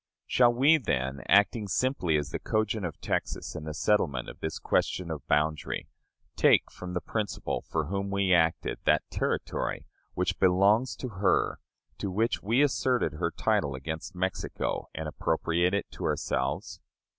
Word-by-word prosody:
Shall 120 -1 +4
we, 140 +7 +5
then, 65 - -2
acting 100 +2 +4
simply 95 - +1
as 75 +1 -3
the - - -3
cogent 110 -3 0
of 80 - -9
Texas - - -3
in 80 - -6
the 80 - -4
settlement 70 -11 +1
of - - -11
this 80 - -3
question 90 -3 0
of 75 - -4
boundary, 75 +1 0 0.5
take - - +4
from 90 0 -7
the 90 - 0
principal 105 -4 -3
for 80 -2 -2
whom 100 +4 -2
we 100 -1 +2
act 80 -1 +3 0.2
that - - +4
territory - - -2 0.3
which - - -1
belongs 100 +7 +4
to 130 - -5
her, 100 - +2 0.4
to 100 - -2
which 110 +5 0
we 115 +8 +3
asserted 130 - +1
her 75 - -1
title 70 -2 0
against 80 +8 -6
Mexico, 95 0 -2
and 80 - -4
appropriate 85 +4 0
it 100 - -1
to - - -6
ourselves? - - -2
95 Hz, 155 wpm, -28 LUFS, 80-110 Hz, 0.5 s, we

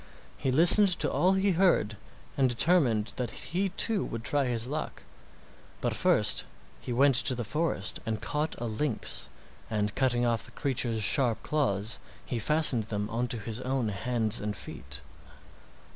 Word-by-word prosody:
He 130 - -2
listened 175 +8 +8
to - - -1
all 185 +2 +2
he 195 +1 +1
heard 175 - +2 0.4
and 135 -2 +2
determined 120 -5 +2
that 125 -2 -2
he 185 +10 -3
too 200 +2 0
would 115 0 -6
try 145 +2 0
his 120 -2 -1
luck. 150 +3 -5 0.8
But - - -1
first - - +2 0.3
he - - -7
went 135 +3 +4
to 130 0 +2
the 120 - -3
forest 150 - -2
and 110 -1 -3
caught 150 +7 -2
a 120 - -4
lynx, 110 - -1 0.4
and 105 -2 -1
cutting 120 -2 +1
off 115 -2 0
the - - -11
creature's 120 -5 0
sharp 115 0 +2
claws, 110 -8 0 0.3
he 120 - -3
fastened 140 -3 +3
them 105 0 -4
on 120 +2 -1
to 120 - -4
his 110 +2 -6
own 130 -3 -1
hands 110 +1 -1
and 105 -1 -4
feet. 65 +1 -7
120 Hz, 160 wpm, -28 LUFS, 110-145 Hz, 0.8 s, listened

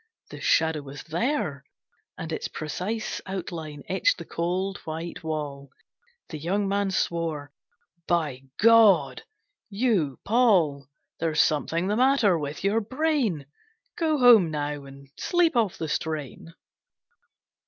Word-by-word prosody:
The - - -9
Shadow 160 -2 +2
was 140 0 -9
there, 170 - -2 0.5
and 160 -3 -6
its - - -3
precise 190 +8 -4
Outline 165 -6 -6
etched 190 0 +2
the 170 - -8
cold, 185 +4 -2
white 165 +2 -6
wall. 145 -3 -4 0.6
The 155 - -6
young 195 +6 -1
man 200 0 0
swore, 165 -5 -2 0.6
"By 150 -7 -1
God! 205 - +5 0.5
You, 195 - 0
Paul, 185 - +3 0.3
There's 160 -2 0
something 160 +3 +1
the 205 +2 0
matter 255 -7 +4
with 150 0 -4
your 205 +3 +2
brain. 255 - -1 0.5
Go 315 -2 +1
home 235 - +7
now 145 -2 -3
and 135 0 -14
sleep 345 -4 +2
off 220 -6 +1
the 160 - -3
strain." 155 +1 -4
170 Hz, 120 wpm, -26 LUFS, 150-205 Hz, 0.6 s, home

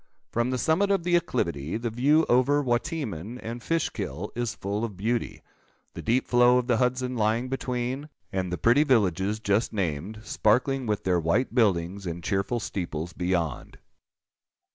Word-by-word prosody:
From 120 +2 0
the 130 - 0
summit 160 - +2
of 195 -3 +2
the 175 0 +2
acclivity, 85 - -1
the 115 0 -3
view 145 +7 +3
over 140 +4 +3
Wateaman 120 - -2
and 120 0 -6
Fishkill 105 - -2
is 120 -1 -2
full 100 +3 -3
of 105 -5 -4
beauty; 115 +5 -2 0.5
the - - -7
deep 120 +3 +1
flow 125 0 +5
of 125 - 0
the 120 -2 +2
Hudson 125 +1 0
lying 115 +3 +1
between, 130 +2 -3 0.2
and 95 -2 -1
the 90 - -2
pretty 120 +6 +4
villages 105 - +2
just 105 +1 +1
named, 95 +2 -2
sparkling 125 +5 +1
with 105 -1 -1
their 90 -3 +2
white 95 +12 +1
buildings 95 -5 +1
and 85 0 -5
cheerful 100 +7 0
steeples, 85 -5 -4
beyond. 85 -8 -2
115 Hz, 160 wpm, -26 LUFS, 95-125 Hz, 0.5 s, flow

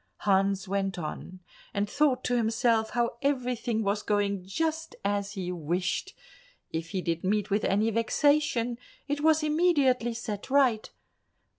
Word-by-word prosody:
Hans 195 -1 +2
went 195 0 -1
on, 180 +3 -6 0.3
and 205 +1 0
thought 280 -1 +1
to 245 - 0
himself 225 -1 +2
how 235 -1 -1
everything 250 -5 0
was 205 +1 0
going 205 -2 0
just 320 - -2
as 200 0 -1
he 185 -3 -4
wished; 180 - -2 0.6
if 165 0 -4
he 185 +1 -3
did 170 0 -2
meet 205 +1 0
with 205 +2 +1
any 215 +3 +2
vexation 245 +1 +1 0.3
it 290 0 -2
was 315 0 +4
immediately 285 -7 +2
set 215 -2 -5
right. 260 -5 +3
220 Hz, 140 wpm, -28 LUFS, 195-260 Hz, 0.6 s, was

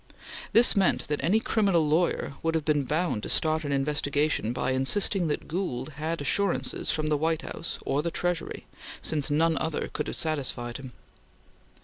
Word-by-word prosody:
This 235 +2 +6
meant 195 -2 +2
that 150 - -1
any 200 +6 +3
criminal 195 -8 +2
lawyer 160 -2 +1
would 165 0 0
have 160 -2 -1
been 150 -3 +1
bound 155 -4 0
to - - -6
start 155 0 +3
an 145 - -3
investigation 145 -2 +1
by 125 +2 -1
insisting 175 +7 +1
that 150 - -3
Gould 155 -7 -3
had 155 +2 -4
assurances 195 +6 0
from 155 - +1
the 155 -1 +1
White 160 +2 0
House 165 - -5
or 140 - +1
the 170 - -2
Treasury, 175 0 -3 0.4
since 150 -2 0
none 160 +2 +2
other 160 -1 -2
could - - -4
have - - -2
satisfied 130 -6 -2
him. 130 -2 -10
155 Hz, 170 wpm, -27 LUFS, 145-165 Hz, 0.4 s, This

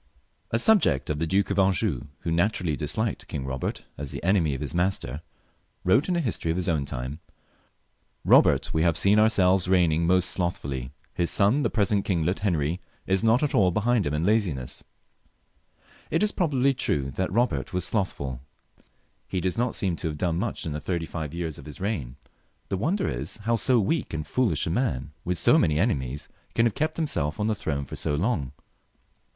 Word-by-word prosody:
A 115 - +1
SUBJECT 120 - +3
of 75 - -2
the 80 - -1
Duke 100 +3 +1
of 100 - +1
Anjou, 95 - +1
who 85 - -2
naturally 85 -2 +1
disliked 80 +10 -2
King 70 -2 -4
Eobert 65 -1 -4 0.2
as 75 -2 -4
the - - -7
enemy 85 -6 +2
of 65 - -6
his 75 - -4
master, 85 -6 -1 0.6
wrote 95 - +3
in 180 - +1
a - - +1
history 115 - -2
of 80 - 0
his 90 - -1
own 80 -5 +1
time, 65 +3 -5 0.5
" - - -23
Eobert - - +5
we 80 - +1
have 85 -1 +3
ourselves 100 -3 +4
seen 90 - -2
reigning 85 -3 +3
most 90 0 +3
slothfuUy; 70 -8 -3 0.2
his 85 - 0
son, 105 +8 +3
the 115 - +1
present 100 -2 +1
kinglet 90 -1 0
Henry, 85 -3 0 0.2
is 95 +2 +1
not 115 +5 +4
at 150 - 0
all 95 -3 +4
behind 105 0 +1
him 75 - -2
in 75 - -1
lazinesa" 90 - 0 1.3
It 165 +6 +1
is 210 - +3
probably 140 -6 +2
true 70 - -1
that 95 +7 -2
Eobert 95 - 0
was 90 -1 -1
slothful; 70 - -2 0.9
he 95 - -2
does 90 0 -1
not 120 +1 0
seem 95 -4 0
to - - -3
have 75 -1 -4
done 85 +1 0
much 115 +2 -3
in 80 - -3
the 75 - -3
thirty 85 +2 -2
five 80 -3 -5
years 85 -2 -4
of 70 - -11
his 75 - -10
reign; 85 - -3 0.5
the - - 0
wonder 170 - 0
is 70 - -4
how 115 +1 +2
so 125 +2 +4
weak 110 - -1
and 75 -1 -3
foolish 110 - +1
a 80 - -2
man^ 85 - -1
with 90 0 -1
so - - +5
many 75 -1 +2
enemies, 70 - -1 0.3
can 115 - +4
have 115 - +2
kept 155 +7 -1
himself 85 - -1
on 105 - 0
the 110 - +1
throne 75 -9 -3
for - - -8
so 75 - 0
long 100 +11 +1
a - - -6
time. 65 - -10
90 Hz, 200 wpm, -26 LUFS, 75-110 Hz, 1.3 s, Eobert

